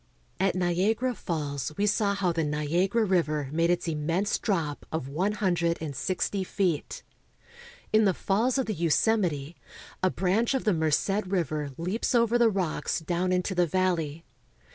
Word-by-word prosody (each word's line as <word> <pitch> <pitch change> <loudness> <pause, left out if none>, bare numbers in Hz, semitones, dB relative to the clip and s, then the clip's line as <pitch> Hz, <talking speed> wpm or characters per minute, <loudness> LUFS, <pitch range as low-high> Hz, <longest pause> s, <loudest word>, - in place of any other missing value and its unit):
At 190 0 +2
Niagara 190 +8 +1
Falls 145 - -3
we 205 - +2
saw 205 -1 +1
how 190 -3 +1
the 165 -1 -1
Niagara 170 +9 +1
River 155 -7 0
made 165 +2 +1
its 175 0 0
immense 165 +5 0
drop 165 -9 -1
of 160 -4 -3
one 180 +9 -1
hundred 175 -5 +1
and 150 -3 -5
sixty 190 +6 -1
feet. 185 -5 -2 0.9
In 215 0 +5
the 190 - +3
falls 230 +7 +1
of 265 - +1
the 215 - -2
Yosemite 170 -3 +1 0.4
a 185 - +3
branch 200 +9 +1
of 265 - -1
the 210 - +2
Merced 170 +6 +1
River 155 -6 -1
leaps 190 +9 -1
over 235 0 +3
the 235 -1 +5
rocks 180 -7 -1
down 175 +3 -1
into 180 +1 0
the 180 -1 +2
valley. 165 -3 -1
180 Hz, 160 wpm, -27 LUFS, 160-200 Hz, 0.9 s, In